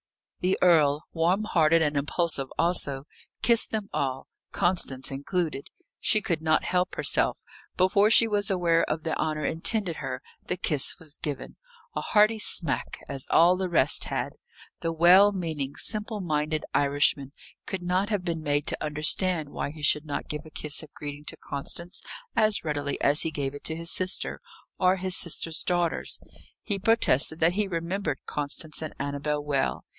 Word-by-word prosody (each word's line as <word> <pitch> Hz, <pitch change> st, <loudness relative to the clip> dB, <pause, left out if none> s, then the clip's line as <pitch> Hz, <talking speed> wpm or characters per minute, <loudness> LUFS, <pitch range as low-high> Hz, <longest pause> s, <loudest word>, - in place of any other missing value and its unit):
The 185 Hz, +1 st, 0 dB
earl, 155 Hz, -4 st, +4 dB
warm 175 Hz, +5 st, +1 dB
hearted 165 Hz, -5 st, +3 dB
and 150 Hz, -1 st, -1 dB
impulsive 145 Hz, 0 st, 0 dB
also, 150 Hz, -6 st, +1 dB, 0.4 s
kissed 235 Hz, -1 st, +3 dB
them 215 Hz, -2 st, -3 dB
all, 135 Hz, -1 st, -2 dB, 0.3 s
Constance 140 Hz, -8 st, 0 dB
included. 145 Hz, +1 st, -3 dB, 0.3 s
She 215 Hz, -, +3 dB
could 170 Hz, -6 st, -2 dB
not 160 Hz, 0 st, +2 dB
help 180 Hz, 0 st, -1 dB
herself; -, -, +1 dB, 0.3 s
before 200 Hz, +3 st, +3 dB
she 225 Hz, 0 st, +6 dB
was 205 Hz, -2 st, +1 dB
aware 170 Hz, -3 st, +2 dB
of 155 Hz, +1 st, -3 dB
the 160 Hz, -, -2 dB
honour 155 Hz, -1 st, -1 dB
intended 175 Hz, +1 st, 0 dB
her, 130 Hz, -3 st, -5 dB, 0.3 s
the 180 Hz, -, -2 dB
kiss 150 Hz, -6 st, +3 dB
was 160 Hz, -4 st, -6 dB
given 145 Hz, -4 st, -5 dB, 0.4 s
a -, -, -2 dB
hearty 215 Hz, +1 st, +3 dB
smack, 165 Hz, -7 st, +1 dB
as 135 Hz, -2 st, -3 dB
all 175 Hz, +2 st, +5 dB
the 185 Hz, 0 st, -3 dB
rest 150 Hz, -5 st, +2 dB
had. -, -, -3 dB, 0.5 s
The 165 Hz, -, -2 dB
well 180 Hz, +5 st, +6 dB
meaning, 160 Hz, -8 st, -4 dB
simple 215 Hz, 0 st, +1 dB
minded 155 Hz, -3 st, -2 dB
Irishman 140 Hz, -1 st, +2 dB, 0.4 s
could 190 Hz, -2 st, -4 dB
not 185 Hz, +3 st, 0 dB
have 205 Hz, -4 st, -1 dB
been 165 Hz, -2 st, -3 dB
made 145 Hz, -1 st, -1 dB
to -, -, +1 dB
understand 155 Hz, +2 st, +1 dB
why -, -, -4 dB
he 150 Hz, 0 st, -11 dB
should 150 Hz, +1 st, +3 dB
not 145 Hz, -, -4 dB
give 150 Hz, +1 st, -6 dB
a -, -, -12 dB
kiss 150 Hz, -1 st, -2 dB
of 155 Hz, -2 st, -13 dB
greeting 145 Hz, 0 st, -8 dB
to -, -, -6 dB
Constance 170 Hz, +5 st, -6 dB, 0.3 s
as 215 Hz, -2 st, +2 dB
readily 145 Hz, -2 st, -2 dB
as 145 Hz, +2 st, +3 dB
he 160 Hz, -, +1 dB
gave 140 Hz, -3 st, -3 dB
it 145 Hz, -, -10 dB
to 160 Hz, -, -1 dB
his 170 Hz, 0 st, -1 dB
sister, 185 Hz, 0 st, 0 dB, 0.4 s
or 185 Hz, 0 st, +3 dB
his 185 Hz, -1 st, 0 dB
sister's 165 Hz, -1 st, +1 dB
daughters. 175 Hz, -2 st, 0 dB, 0.4 s
He 200 Hz, -2 st, -2 dB
protested 185 Hz, -, +3 dB
that 165 Hz, +2 st, +4 dB
he 205 Hz, +1 st, -1 dB
remembered 170 Hz, -3 st, -3 dB
Constance 150 Hz, +2 st, -1 dB
and 155 Hz, -, -6 dB
Annabel 145 Hz, +1 st, -3 dB
well. 140 Hz, -2 st, -1 dB
165 Hz, 170 wpm, -26 LUFS, 145-185 Hz, 0.5 s, she